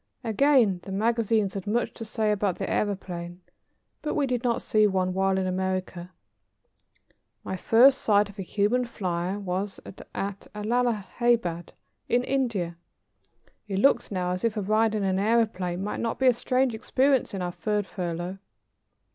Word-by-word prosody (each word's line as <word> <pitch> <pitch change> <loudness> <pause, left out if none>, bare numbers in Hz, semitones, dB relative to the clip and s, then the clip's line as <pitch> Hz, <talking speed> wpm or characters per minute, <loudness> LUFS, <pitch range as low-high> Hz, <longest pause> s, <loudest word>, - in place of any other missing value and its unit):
Again 235 -4 +3
the 195 - -9
magazines 220 -1 +1
had 195 0 -6
much 235 +4 0
to - - -7
say 215 -1 0
about 200 -3 0
the - - -3
aëroplane, 175 -4 -3 0.6
but 300 - -2
we 290 - +2
did 250 -2 -2
not 240 -2 0
see 215 -1 +3
one 185 -2 0
while 190 0 +1
in 190 - 0
America. 185 -1 -2 1.3
My - - -4
first 255 +8 +5
sight 205 -1 +3
of 200 0 -14
a - - -1
human 210 +6 +1
flyer 185 -5 -3
was 195 0 -3
at 195 +1 -6
Allahabad, 225 -4 0 0.4
in 245 +1 +2
India. 230 -11 -1 0.9
It 195 -2 -2
looks 275 +8 +3
now 180 -2 -1
as 180 0 -3
if 230 -1 0
a - - 0
ride 215 +2 +2
in 210 - -1
an 190 -1 +1
aëroplane 200 -4 +1
might 205 - -3
not 230 -1 -2
be 265 - 0
a 255 - +7
strange 255 +1 +1
experience 255 +1 +1
in 185 - -3
our 175 - -2
third 210 +2 -1
furlough. 175 0 -4
205 Hz, 160 wpm, -26 LUFS, 185-235 Hz, 1.3 s, a